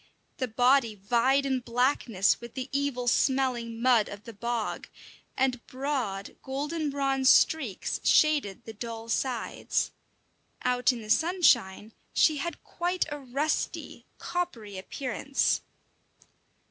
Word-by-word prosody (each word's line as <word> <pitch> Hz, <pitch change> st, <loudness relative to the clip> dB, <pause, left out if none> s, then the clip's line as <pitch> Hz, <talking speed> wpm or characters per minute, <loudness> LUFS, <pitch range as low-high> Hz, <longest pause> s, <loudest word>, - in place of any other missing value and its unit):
The 255 Hz, -, -1 dB
body 245 Hz, 0 st, +3 dB
vied 240 Hz, +7 st, +2 dB
in 265 Hz, -1 st, +1 dB
blackness 235 Hz, -5 st, +1 dB
with 235 Hz, -1 st, -10 dB
the 260 Hz, 0 st, -4 dB
evil 275 Hz, -3 st, -1 dB
smelling 245 Hz, -3 st, +1 dB
mud 235 Hz, -3 st, +4 dB
of 205 Hz, 0 st, -9 dB
the 230 Hz, -, -9 dB
bog, 235 Hz, +1 st, -3 dB, 0.5 s
and 255 Hz, -2 st, +1 dB
broad, 255 Hz, -8 st, -3 dB
golden 295 Hz, +4 st, -3 dB
bronze 270 Hz, -1 st, +2 dB
streaks 265 Hz, -12 st, +2 dB
shaded 295 Hz, -11 st, +3 dB
the 225 Hz, -, -8 dB
dull 225 Hz, +1 st, -7 dB
sides. 245 Hz, 0 st, -1 dB, 0.7 s
Out 250 Hz, +1 st, +3 dB
in 235 Hz, -3 st, -6 dB
the 215 Hz, -, -11 dB
sunshine 240 Hz, -, +3 dB, 0.2 s
she 310 Hz, -2 st, +4 dB
had 340 Hz, +5 st, -5 dB
quite 355 Hz, +1 st, -1 dB
a 295 Hz, -, -4 dB
rusty, 280 Hz, +4 st, -3 dB
coppery 250 Hz, -, -4 dB
appearance. 270 Hz, +7 st, -1 dB
255 Hz, 120 wpm, -28 LUFS, 230-280 Hz, 0.7 s, mud